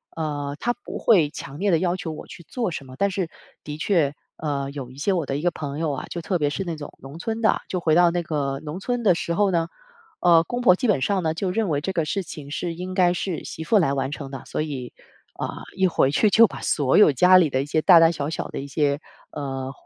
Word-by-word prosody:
呃， 145 Hz, -3 st, -3 dB
他 240 Hz, -, 0 dB
不 -, -, -8 dB
会 175 Hz, -10 st, +4 dB
强 145 Hz, -1 st, -9 dB
烈 200 Hz, +2 st, +1 dB
地 170 Hz, -, +4 dB
要 175 Hz, +1 st, 0 dB
求 175 Hz, -3 st, -5 dB
我 155 Hz, -, -8 dB
去 170 Hz, -, -12 dB
做 235 Hz, -7 st, -2 dB
什 145 Hz, -4 st, -6 dB
么。 130 Hz, -, -11 dB
但 200 Hz, +4 st, +1 dB
是， 185 Hz, -3 st, -2 dB, 0.3 s
的 150 Hz, 0 st, -6 dB
确 155 Hz, -4 st, +1 dB, 0.2 s
呃， 140 Hz, -3 st, -3 dB
有 140 Hz, -3 st, -7 dB
一 130 Hz, -, -14 dB
些 185 Hz, +7 st, 0 dB
我 170 Hz, -6 st, -1 dB
的 135 Hz, -, -1 dB
一 150 Hz, -, -5 dB
个 175 Hz, -, +2 dB
朋 145 Hz, -3 st, -5 dB
友 160 Hz, -1 st, -1 dB
啊， 135 Hz, -, -4 dB
就 170 Hz, -, -5 dB
特 180 Hz, +1 st, -1 dB
别 145 Hz, -1 st, +1 dB
是 175 Hz, +6 st, -3 dB
那 170 Hz, -3 st, -4 dB
种 150 Hz, -1 st, -8 dB
农 140 Hz, +4 st, -10 dB
村 225 Hz, +4 st, -3 dB
的， 220 Hz, -, +2 dB
就 185 Hz, -, -1 dB
回 160 Hz, -2 st, +1 dB
到 175 Hz, +1 st, +6 dB
那 175 Hz, 0 st, -1 dB
个 140 Hz, -4 st, -2 dB
农 155 Hz, +4 st, -5 dB
村 245 Hz, +4 st, -2 dB
的 200 Hz, -, +5 dB
时 170 Hz, 0 st, -2 dB
候 200 Hz, 0 st, +2 dB
呢， 165 Hz, -2 st, +1 dB, 0.5 s
呃， 170 Hz, -2 st, +6 dB
公 245 Hz, +8 st, -4 dB
婆 205 Hz, -7 st, +6 dB
基 245 Hz, -, -1 dB
本 170 Hz, -12 st, +2 dB
上 200 Hz, -2 st, +1 dB
呢， 160 Hz, -1 st, -1 dB
就 185 Hz, +2 st, -1 dB
认 215 Hz, 0 st, 0 dB
为 145 Hz, -2 st, 0 dB
这 190 Hz, +5 st, -3 dB
个 165 Hz, -, +1 dB
事 195 Hz, +6 st, -2 dB
情 150 Hz, -4 st, -9 dB
是 170 Hz, +3 st, -3 dB
应 180 Hz, +2 st, -6 dB
该 180 Hz, -2 st, +4 dB
是 180 Hz, -1 st, -3 dB
媳 160 Hz, -, -7 dB
妇 210 Hz, +7 st, +3 dB
来 165 Hz, -8 st, +2 dB
完 135 Hz, -1 st, -1 dB
成 140 Hz, -2 st, -7 dB
的， 135 Hz, -2 st, -6 dB
所 -, -, -2 dB
以， 135 Hz, -5 st, -5 dB, 0.5 s
呃， -, -, -1 dB, 0.3 s
一 190 Hz, -, +2 dB
回 165 Hz, -6 st, +3 dB
去 200 Hz, +9 st, +2 dB
就 230 Hz, +2 st, +7 dB
把 -, -, -9 dB
所 140 Hz, -3 st, +2 dB
有 210 Hz, -, +7 dB
家 180 Hz, +7 st, +6 dB
里 165 Hz, -6 st, +3 dB
的 130 Hz, -, +1 dB
一 140 Hz, -, -5 dB
些 155 Hz, +1 st, 0 dB
大 175 Hz, -3 st, +8 dB
大 165 Hz, 0 st, +6 dB
小 150 Hz, -4 st, -3 dB
小 -, -, -3 dB
的 -, -, -8 dB
一 135 Hz, -, -5 dB
些， 140 Hz, 0 st, 0 dB, 0.3 s
呃， 135 Hz, -2 st, -5 dB
165 Hz, 290 characters per minute, -23 LUFS, 145-185 Hz, 0.5 s, 大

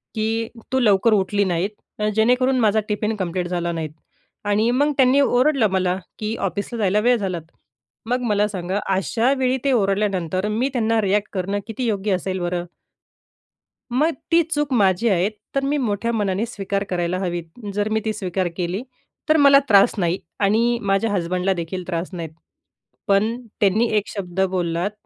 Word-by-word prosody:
की 225 Hz, +1 st, -1 dB, 0.2 s
तू 260 Hz, -, +2 dB
लवकर 215 Hz, -1 st, +4 dB
उठली 205 Hz, 0 st, +2 dB
नाहीत 200 Hz, +3 st, -2 dB
जेणेकरून 250 Hz, +3 st, +3 dB
माझा 220 Hz, -1 st, +3 dB
टिफिन 210 Hz, +1 st, -1 dB
कम्प्लीट 180 Hz, -2 st, -2 dB
झाला 175 Hz, -1 st, -2 dB
नाहीत 160 Hz, -2 st, -4 dB, 0.6 s
आणि 215 Hz, +3 st, +2 dB
मग 290 Hz, +4 st, +2 dB
त्यांनी 265 Hz, +1 st, +5 dB
ओरडलं 260 Hz, -2 st, +3 dB
मला 185 Hz, -1 st, +1 dB, 0.2 s
की 215 Hz, +1 st, -2 dB
ऑफिसला 200 Hz, +4 st, -3 dB
जायला 205 Hz, 0 st, +2 dB
वेळ 245 Hz, +2 st, +3 dB
झाला. 190 Hz, -4 st, -2 dB, 0.7 s
मग 250 Hz, +1 st, 0 dB
मला 210 Hz, 0 st, +2 dB
सांगा, 190 Hz, 0 st, -3 dB, 0.2 s
अशा 225 Hz, +6 st, +1 dB
वेळी 260 Hz, 0 st, +1 dB
ते 275 Hz, -, +2 dB
ओरडल्यानंतर 195 Hz, -3 st, 0 dB
मी 235 Hz, +6 st, 0 dB
त्यांना 225 Hz, -2 st, +1 dB
रिएक्ट 205 Hz, +1 st, 0 dB
करणं 195 Hz, +2 st, -1 dB
किती 235 Hz, +3 st, -4 dB
योग्य 205 Hz, -1 st, -1 dB
असेल 185 Hz, +1 st, -3 dB
बरं? 175 Hz, 0 st, -2 dB, 1.3 s
मग 305 Hz, +7 st, +2 dB, 0.2 s
ती 335 Hz, +1 st, +6 dB
चूक 295 Hz, -3 st, -2 dB
माझी 200 Hz, 0 st, +3 dB
आहेत, 190 Hz, +2 st, +2 dB, 0.2 s
तर 275 Hz, -, +1 dB
मी 290 Hz, +2 st, +1 dB
मोठ्या 230 Hz, -2 st, -1 dB
मनाने 205 Hz, -1 st, 0 dB
स्वीकार 200 Hz, -3 st, -3 dB
करायला 175 Hz, 0 st, -1 dB
हवी. 175 Hz, -2 st, -2 dB, 0.3 s
जर 205 Hz, +1 st, -1 dB
मी 220 Hz, 0 st, +1 dB
ती 215 Hz, -, 0 dB
स्वीकार 185 Hz, -2 st, -2 dB
केली, 180 Hz, +4 st, -2 dB, 0.5 s
तर 315 Hz, -, +5 dB
मला 280 Hz, -1 st, +7 dB
त्रास 200 Hz, +2 st, +6 dB
नाही 175 Hz, 0 st, +1 dB, 0.2 s
आणि 230 Hz, +4 st, +2 dB
माझ्या 200 Hz, +2 st, +1 dB
हसबंडला 185 Hz, 0 st, 0 dB
देखील 180 Hz, +1 st, -4 dB
त्रास 170 Hz, 0 st, -3 dB
नाही. 165 Hz, -2 st, -4 dB, 0.8 s
पण 205 Hz, +4 st, +2 dB, 0.2 s
त्यांनी 215 Hz, +3 st, +3 dB
एक 205 Hz, -, -1 dB
शब्द 185 Hz, -3 st, -6 dB
बोललात, 175 Hz, +2 st, -1 dB
205 Hz, 165 wpm, -22 LUFS, 185-230 Hz, 1.3 s, मला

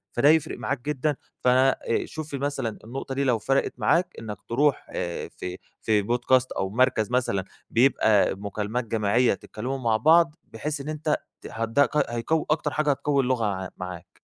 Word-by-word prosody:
فده 130 Hz, +5 st, +5 dB
هيفرق 155 Hz, 0 st, +2 dB
معاك 130 Hz, -, -3 dB
جدًا 150 Hz, +1 st, -1 dB, 0.2 s
ف -, -, -2 dB
آآ 130 Hz, -2 st, +3 dB
شوف 155 Hz, -1 st, -7 dB
لي 140 Hz, -, -2 dB
مثلًا 135 Hz, -5 st, -2 dB
النقطة 135 Hz, +4 st, -6 dB
دي 140 Hz, -, 0 dB
لو 125 Hz, -4 st, +2 dB
فرقِت 135 Hz, +5 st, +1 dB
معاك 175 Hz, +1 st, +2 dB
إنّك 105 Hz, -3 st, -6 dB
ترُوح 140 Hz, +4 st, +1 dB
آآ 85 Hz, -1 st, -4 dB
في 90 Hz, 0 st, -5 dB, 0.2 s
في 105 Hz, -2 st, +2 dB
بودكاست 125 Hz, +4 st, +2 dB
أو 95 Hz, -, -2 dB
مركز 120 Hz, 0 st, +2 dB
مثلًا 120 Hz, -6 st, +1 dB, 0.3 s
بيبقى 115 Hz, -5 st, +3 dB
مكالمات 105 Hz, +4 st, -3 dB
جماعيّة 115 Hz, +2 st, +2 dB
تتكلموا 125 Hz, +7 st, -5 dB
مع 115 Hz, -4 st, +1 dB
بعض 165 Hz, +4 st, +5 dB, 0.2 s
بحيث 145 Hz, +6 st, -3 dB
إن 145 Hz, -, -6 dB
أنت 155 Hz, 0 st, 0 dB, 0.3 s
ت -, -, -8 dB
هت 115 Hz, 0 st, -3 dB
ده 140 Hz, +5 st, +4 dB
قي 150 Hz, -, +1 dB
هيقوّي 120 Hz, +7 st, 0 dB
أكتر 155 Hz, -1 st, +1 dB
حاجة 150 Hz, +2 st, 0 dB
هتقوّي 140 Hz, 0 st, +1 dB
اللغة 125 Hz, -3 st, +1 dB
عَ 95 Hz, -2 st, -2 dB
معاك. 90 Hz, -1 st, -8 dB
125 Hz, 180 wpm, -25 LUFS, 110-145 Hz, 0.3 s, فده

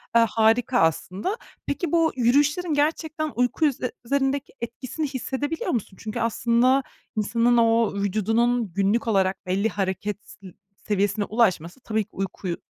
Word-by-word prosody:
Eee, 230 Hz, 0 st, +7 dB
harika 230 Hz, +3 st, +3 dB
aslında. 185 Hz, -, 0 dB, 0.3 s
Peki, 295 Hz, +2 st, -2 dB
bu 330 Hz, -1 st, +3 dB
yürüyüşlerin 290 Hz, +7 st, +2 dB
gerçekten 310 Hz, +1 st, 0 dB
uyku 250 Hz, +6 st, +1 dB
ü 295 Hz, -, +4 dB, 0.3 s
üzerindeki 275 Hz, +1 st, 0 dB
etkisini 255 Hz, +6 st, -4 dB
hissedebiliyor 280 Hz, +3 st, -3 dB
musun? 205 Hz, -5 st, -3 dB
Çünkü 225 Hz, +2 st, -4 dB
aslında 235 Hz, +4 st, +2 dB, 0.3 s
insanın 235 Hz, +3 st, +2 dB
o 230 Hz, -2 st, +3 dB
vücudunun 220 Hz, +2 st, +1 dB
günlük 200 Hz, +5 st, +1 dB
olarak 195 Hz, -2 st, +1 dB
belli 195 Hz, +4 st, +1 dB
hareket 195 Hz, +1 st, -2 dB
s 195 Hz, -, -13 dB, 0.3 s
seviyesine 205 Hz, 0 st, 0 dB
ulaşması 195 Hz, -4 st, +1 dB
tabii 220 Hz, -3 st, -1 dB
ki 205 Hz, -, -26 dB
uykuyu 185 Hz, -2 st, -4 dB
230 Hz, 130 wpm, -24 LUFS, 205-270 Hz, 0.3 s, Eee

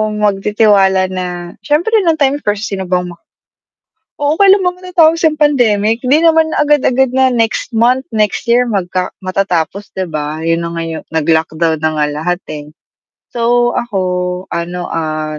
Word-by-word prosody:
magtitiwala 200 Hz, -2 st, +2 dB
na 180 Hz, -1 st, -5 dB
siyempre 310 Hz, +9 st, 0 dB, 0.2 s
nung 325 Hz, -, +4 dB
time 285 Hz, -1 st, +1 dB
first 210 Hz, -3 st, -3 dB
sino 190 Hz, -2 st, -4 dB
bang 180 Hz, -1 st, -1 dB
ma 170 Hz, -, -14 dB, 1.0 s
Oo, 290 Hz, +1 st, +1 dB
kailan 390 Hz, -1 st, +5 dB
ba 360 Hz, -, +2 dB
matatapos 335 Hz, -3 st, +2 dB
yang 310 Hz, -, -1 dB
pandemic, 230 Hz, -7 st, +2 dB
di 285 Hz, +6 st, +2 dB
naman 320 Hz, -1 st, +4 dB
agad-agad 265 Hz, -3 st, +2 dB
na 260 Hz, 0 st, +3 dB
next 225 Hz, +1 st, -1 dB
month, 250 Hz, +4 st, +2 dB
next 215 Hz, +1 st, 0 dB
year 240 Hz, +1 st, +4 dB
magka 185 Hz, -5 st, -2 dB
matatapos, 190 Hz, +1 st, -2 dB
'di 190 Hz, -1 st, -3 dB
ba, 150 Hz, 0 st, -4 dB
'yun 165 Hz, +1 st, 0 dB
na 170 Hz, -, -4 dB
nga 165 Hz, -, -3 dB
'yu 160 Hz, -1 st, -5 dB
naglockdown 160 Hz, 0 st, 0 dB
na 155 Hz, -, +2 dB
nga 150 Hz, -, +3 dB
lahat, 165 Hz, +4 st, -2 dB
eh. 150 Hz, -1 st, -6 dB, 0.7 s
So, 240 Hz, 0 st, +1 dB
ako 220 Hz, -5 st, -3 dB, 0.5 s
ano, 175 Hz, +1 st, -4 dB
ah, 155 Hz, -1 st, -3 dB
205 Hz, 155 wpm, -14 LUFS, 175-265 Hz, 1.0 s, kailan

